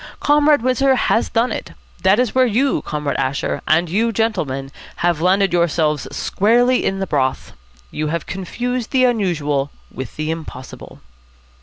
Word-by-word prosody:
Comrade 295 -3 +3
Windsor 260 +1 +3
has 230 - +1
done 230 +2 +1
it. - - -5 0.3
That 190 +2 +4
is 250 -2 +1
where 255 -1 +4
you, 260 +5 +1
Comrade 150 -1 -3
Asher, 135 0 -2
and 165 +3 +3
you, 220 +7 +1
gentlemen, 160 -12 -2 0.3
have 170 -3 +1
landed 190 +1 +2
yourselves 155 -4 +1
squarely 240 +5 +2
in 195 - 0
the 195 - -2
broth. 130 -6 -1 0.4
You 155 0 -3
have 165 +1 -3
confused 240 +6 -4
the 260 -2 +2
unusual 155 - 0 0.2
with 130 -2 -7
the 155 +1 -2
impossible." 155 -5 -9
190 Hz, 150 wpm, -19 LUFS, 150-240 Hz, 0.4 s, That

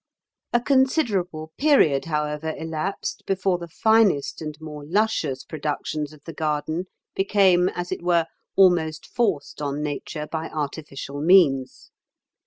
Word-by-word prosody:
A 240 - +3
considerable 225 - +1
period, 270 - +4
however, 150 0 -2
elapsed 160 +4 -4
before 190 -2 +1
the 170 - -7
finest 215 -6 +2
and 155 -1 -5
more 150 -2 -8
luscious 165 -6 0
productions 150 0 -3
of 150 -2 -16
the 165 - -8
garden 155 +3 -2 0.3
became 190 -2 +3
as 175 0 -5
it - - -3
were 170 -2 +2 0.3
almost 170 -5 +3
forced 200 -11 -1
on 145 0 -2
nature 150 +1 -4
by 160 +1 -4
artificial 145 -1 -5
means. 150 -7 +3
160 Hz, 125 wpm, -24 LUFS, 150-190 Hz, 0.3 s, period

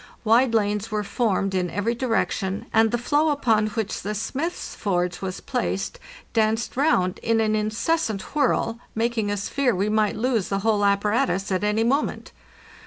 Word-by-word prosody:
Wide 230 +2 +4
lanes 210 0 0
were 210 -1 -1
formed 200 -2 0
in 180 -1 0
every 205 +6 -1
direction, 225 -5 -1
and 225 0 +5
the 240 - 0
floe 290 +6 +2
upon 225 -7 +2
which 215 -1 -3
the 210 +1 -3
smith's 280 - -3
forge 180 -3 -1
was 190 -1 -4
placed 245 - -2 0.3
danced 225 +1 +1
round 185 - +2
in 230 0 +1
an 215 -1 +2
incessant 215 - 0
whirl, 245 -5 +1 0.2
making 225 -2 0
us 205 -1 -2
fear 275 -6 +1
we 200 +3 0
might 215 -1 +1
lose 230 -3 0
the 195 0 -1
whole 215 -2 +2
apparatus 200 -1 +1
at 185 +1 0
any 210 +2 +2
moment. 275 +6 -1
215 Hz, 165 wpm, -24 LUFS, 200-235 Hz, 0.3 s, and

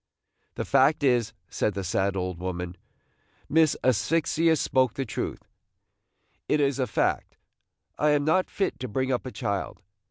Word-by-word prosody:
"The - - -3
fact 140 +3 +3
is," 120 -4 +2 0.2
said 105 - -1
the 100 - -3
sad 95 +1 0
old 90 -2 -3
woman, 90 -1 -4 0.7
"Miss 160 -1 +3
Asphyxia 160 +7 +2
spoke 130 -4 +1
the 135 - -2
truth. - - -4 1.1
It 150 - +3
is 140 -1 +1
a 130 - +1
fact, - - -1 0.6
I 150 - +3
am 145 -1 +2
not 170 +4 +2
fit 195 - -2
to 130 - -4
bring 130 +4 -1
up 125 0 -1
a - - -5
child. 100 -4 -3
130 Hz, 155 wpm, -26 LUFS, 100-150 Hz, 1.1 s, fact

